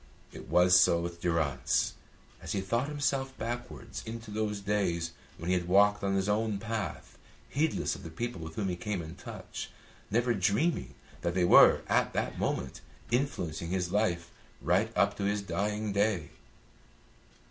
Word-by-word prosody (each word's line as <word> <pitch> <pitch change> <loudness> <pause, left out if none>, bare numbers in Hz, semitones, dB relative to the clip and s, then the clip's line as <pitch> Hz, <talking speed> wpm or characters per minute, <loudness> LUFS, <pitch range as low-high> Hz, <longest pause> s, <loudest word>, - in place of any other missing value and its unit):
It - - -10
was 90 +1 +6
so 85 -1 +4
with 85 0 -5
Durrance 85 -5 +1 0.5
as - - -4
he 95 - 0
thought 115 +8 0
himself 135 -2 -1
backwards 120 +2 -5
into 115 -1 -7
those 105 -1 -1
days 95 -5 0 0.3
when 85 +2 -2
he - - +4
had 90 -1 0
walked 100 +2 +4
on 95 0 +1
his 95 0 +1
own 105 0 +1
path, 110 -4 -5 0.3
heedless 150 +3 0
of - - -8
the 80 - -8
people 95 +3 -4
with 80 0 -7
whom 100 -3 -1
he 90 - -1
came 95 0 -3
in 80 +1 -8
touch, - - -8 0.4
never 120 +3 +2
dreaming 105 - 0 0.3
that 85 0 -1
they 90 -1 +3
were - - +7
at - - +2
that - - -2
moment 65 - -2 0.3
influencing 85 - -1
his 90 -1 -1
life 85 -5 0 0.3
right - - +2
up - - +3
to 100 - -2
his 100 0 0
dying 105 +1 -2
day. 100 -6 +1
100 Hz, 165 wpm, -30 LUFS, 85-110 Hz, 0.5 s, were